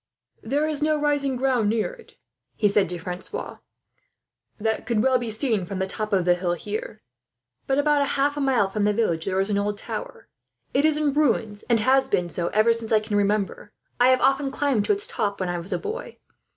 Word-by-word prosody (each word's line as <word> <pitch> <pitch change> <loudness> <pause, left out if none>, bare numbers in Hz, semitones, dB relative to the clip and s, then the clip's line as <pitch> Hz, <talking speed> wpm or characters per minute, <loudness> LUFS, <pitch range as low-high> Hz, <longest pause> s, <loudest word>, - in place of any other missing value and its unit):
"There 285 +7 0
is 305 -2 -1
no 305 0 +2
rising 290 -2 0
ground 250 -4 +1
near 225 - 0
it," 475 -2 -17 0.4
he 210 - +2
said 200 -3 +2
to 180 - -4
Francois, 180 - -6 1.0
"that 220 +1 -2
could 230 -3 +1
well 260 -1 +3
be 240 -1 -4
seen 220 -2 0
from 185 +2 -5
the 190 - 0
top 215 +2 -4
of 190 -3 +2
the 180 - +5
hill 175 0 -1
here; 210 +4 -6 0.6
but 270 - +1
about 290 -1 +2
half 285 +1 +1
a - - -4
mile 270 -5 +3
away 195 0 -4
from 215 - -1
the 210 0 +3
village 175 -7 0
there 190 -1 0
is 195 +2 0
an 200 - +1
old 205 0 -1
tower. - - -6 0.5
It 280 +3 +3
is 310 -1 +3
in 300 -2 +1
ruins, 230 -8 +1
and 235 -1 +4
has 265 +3 +3
been 175 -8 0
so 170 +1 -2
ever 215 +4 +3
since 230 -1 -5
I 220 - +5
can 215 -1 -4
remember. 205 0 0 0.3
I 245 - +6
have 255 0 +4
often 270 +1 +2
climbed 270 -6 0
to - - +1
its 405 0 +1
top, 200 -1 -2
when 185 -2 -2
I 175 0 -2
was 170 +3 -3
a - - +1
boy. 460 +2 -6
225 Hz, 225 wpm, -24 LUFS, 200-280 Hz, 1.0 s, I